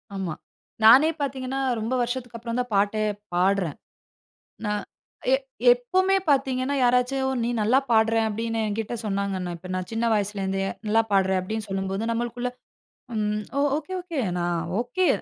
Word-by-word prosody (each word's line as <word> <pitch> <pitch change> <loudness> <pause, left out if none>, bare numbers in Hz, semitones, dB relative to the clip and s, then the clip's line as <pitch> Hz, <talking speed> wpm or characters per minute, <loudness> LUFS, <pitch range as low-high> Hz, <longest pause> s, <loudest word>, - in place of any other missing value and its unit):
ஆமா. 190 -4 -3 0.5
நானே 260 +8 +8
பாத்தீங்கன்னா, 270 -1 -2 0.2
ரொம்ப 225 +3 -2
வருஷத்துக்கப்பறம் 240 -1 -3
தான் 245 -1 -3
பாட்டே 205 +2 +2 0.3
பாடுறேன். 185 -3 +1 0.9
நான் 210 0 -1 0.5
எ - - +6 0.4
எப்பவுமே 390 -6 +2
பாத்தீங்கன்னா, 265 -1 +1
யாராச்சு 250 +2 +3 0.3
"நீ 235 - 0
நல்லா 225 +5 +4
பாடுற" 225 0 +4
அப்படின்னு 225 +1 -2
என்கிட்ட 215 +2 -3
சொன்னாங்கன்னா, 195 -3 -2
இப்ப 180 +2 -11
நான் 185 -1 -3
சின்ன 225 +1 -1
வயசிலேருந்தே 195 -2 -1 0.2
"நல்லா 220 +2 +4
பாடுற" 190 -1 +3
அப்படின்னு 215 +3 -4
சொல்லும்போது, 195 +2 -2
நம்மளுக்குள்ள 240 +1 -2 0.7
"ம். 210 0 -1
ஓ! - - +3 0.2
Okay, 315 +5 -6
okay. 335 -5 -3 0.2
நான் 175 -1 0 0.2
ஒகே. 355 +9 +1
225 Hz, 135 wpm, -25 LUFS, 200-250 Hz, 0.9 s, நானே